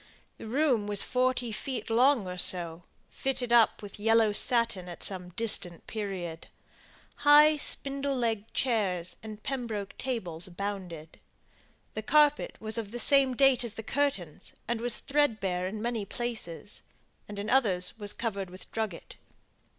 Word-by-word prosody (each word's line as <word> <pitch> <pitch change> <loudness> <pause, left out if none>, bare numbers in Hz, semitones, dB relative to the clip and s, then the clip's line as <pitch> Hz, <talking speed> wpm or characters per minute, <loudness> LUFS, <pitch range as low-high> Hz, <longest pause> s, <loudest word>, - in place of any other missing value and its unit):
The - - -8
room 250 -4 +1
was 205 -1 +3
forty 250 -2 0
feet 235 +1 -4
long 245 -1 +4
or 180 0 -6
so, 170 -2 +2 0.3
fitted 255 -3 -2
up 230 -2 +4
with 205 0 -9
yellow 225 0 +4
satin 230 -5 +2
at 175 - -6
some 180 -2 -2
distant 195 -5 -1
period; 185 -6 -5 0.7
high 300 +1 +7
spindle 275 -1 -1
legged 225 -3 -2
chairs 190 -8 0
and 215 -1 -9
pembroke 230 -7 -4
tables 185 -11 -3
abounded. 180 -4 -6 0.7
The 220 - -4
carpet 295 +4 +3
was 220 +1 -1
of 215 -3 -5
the 240 - -6
same 270 0 +5
date 270 -2 +4
as 230 -2 -4
the 225 - -6
curtains, 220 - -2
and 235 0 -2
was 245 0 +1
thread 285 -6 +1
bare 185 -2 -2
in 210 +3 -5
many 235 -3 -2
places; 210 -5 -5 0.5
and 205 - -8
in 200 +1 -4
others 195 -9 +1
was 205 -1 -1
covered 200 -5 -4
with 185 +1 -10
drugget. 220 -6 -5
220 Hz, 150 wpm, -29 LUFS, 190-250 Hz, 0.7 s, high